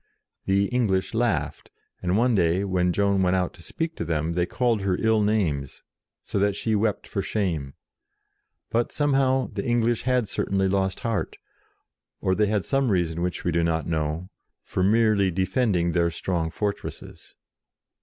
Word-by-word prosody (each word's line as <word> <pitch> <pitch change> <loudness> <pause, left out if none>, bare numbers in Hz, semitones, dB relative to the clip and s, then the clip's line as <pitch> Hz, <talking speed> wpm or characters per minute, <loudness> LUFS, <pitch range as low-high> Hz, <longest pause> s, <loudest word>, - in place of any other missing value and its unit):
The 100 +1 +2
English 105 -7 0
laughed, 115 0 -1 0.3
and 90 +2 +1
one 120 +2 +3
day, 90 -1 +2
when 90 -2 +1
Joan 100 +1 +2
went 90 0 +2
out 90 -1 0
to - - -15
speak 165 - -4
to - - -2
them, 80 0 -1
they 90 0 0
called 120 -4 0
her 95 -2 0
ill 110 -1 +3
names, 85 - -1 0.4
so - - -2
that 100 0 +2
she 110 +2 -1
wept 105 0 0
for 100 - -2
shame. 85 -11 -2 1.0
But, 120 +1 +1
somehow, 135 -3 +1
the 100 -1 -3
English 120 -1 +1
had 125 -3 +1
certainly 95 -1 0
lost 95 0 0
heart, 115 -5 -2 0.8
or 95 - +1
they 105 +2 +2
had 105 -2 0
some 135 -2 +1
reason 85 -4 0
which 90 0 -2
we 90 - 0
do 85 0 +1
not 80 -1 0
know, 80 +2 -2 0.3
for - - -3
merely 105 0 +3
defending 95 -1 +1
their 85 0 +2
strong 85 0 -2
fortresses. 100 +4 -5
100 Hz, 165 wpm, -25 LUFS, 90-110 Hz, 1.0 s, one